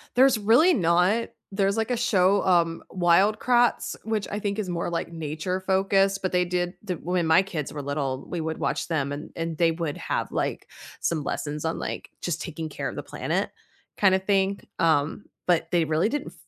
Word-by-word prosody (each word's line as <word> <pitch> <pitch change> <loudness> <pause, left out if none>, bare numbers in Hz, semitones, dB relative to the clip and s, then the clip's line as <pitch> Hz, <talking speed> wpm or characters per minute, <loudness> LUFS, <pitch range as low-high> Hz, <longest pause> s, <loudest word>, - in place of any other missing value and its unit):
There's 260 -1 +6
really 240 - +5
not. 180 +5 +2 0.2
There's 195 0 +1
like 225 +2 0
a 245 - +1
show, 200 -4 +3
um, 170 -3 +2
Wild 190 +4 +3
Kratts, 245 -1 +2
which 220 -2 -1
I 210 - -2
think 200 0 -2
is 200 -4 -3
more, 170 -1 -2
like, 170 0 -3
nature-focused, 190 +5 0
but 185 - -1
they 180 0 +2
did 175 0 -2
the 200 -4 -3
when 175 +1 -1
my 160 +3 +6
kids 165 -8 -5
were 145 - -4
little, 140 -2 -3
we 175 - -3
would 160 0 -3
watch 145 +2 -1
them 145 -4 -1
and 145 - -6
and 165 -1 -3
they 165 -1 +4
would 165 -3 -3
have, - - -2
like, - - -2 0.3
some 155 -3 0
lessons 150 +2 -3
on, 160 - -1
like, - - -5
just 165 -4 -2
taking 160 0 -5
care - - -4
of - - -5
the - - -5
planet, - - -2 0.5
kinda 190 -2 +4
thing, 195 0 +1 0.2
um, 160 +2 +1 0.2
but 175 -2 +2
they 170 -2 +3
really 160 +5 +1
didn't 290 +4 -3
180 Hz, 195 wpm, -26 LUFS, 160-200 Hz, 0.5 s, There's